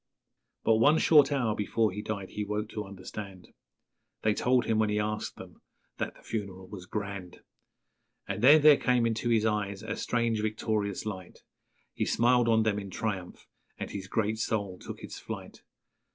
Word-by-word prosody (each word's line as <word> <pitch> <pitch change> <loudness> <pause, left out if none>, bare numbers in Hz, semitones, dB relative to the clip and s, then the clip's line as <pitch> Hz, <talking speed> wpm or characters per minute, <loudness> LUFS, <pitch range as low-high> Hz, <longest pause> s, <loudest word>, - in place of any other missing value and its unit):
'_ - - -54
But 110 - +4
one 145 +8 +5
short 150 -3 +5
hour 125 -6 +1
before 105 +1 0
he 105 +3 -5
died 100 -3 -5
he 105 - -3
woke 105 +1 -3
to 105 -1 -5
understand, 95 -1 -9 0.7
They 110 - +3
told 125 +3 +2
him, 110 -1 +1
when 110 -1 +2
he 105 - 0
asked 105 0 -2
them, - - -12 0.4
that - - -3
the - - -19
funeral 95 -4 -5
was 95 -2 -9
'grand'; 100 -4 -5 0.9
And 100 +1 -3
then 145 +4 +7
there 150 -2 +8
came 125 -2 +2
into 115 +1 0
his 110 -2 +3
eyes 105 -2 -1
a 110 - -3
strange 115 -2 0
victorious 110 -2 -1
light, 95 -4 -7 0.5
He - - -1
smiled 120 0 +3
on 110 -1 +4
them 105 -2 +1
in 100 -1 -7
triumph, 95 -2 -4 0.3
and - - -5
his 95 -1 -6
great 110 +2 -1
soul 100 -4 -2
took - - -9
its - - -7
flight. - - -8
105 Hz, 180 wpm, -29 LUFS, 100-115 Hz, 0.9 s, there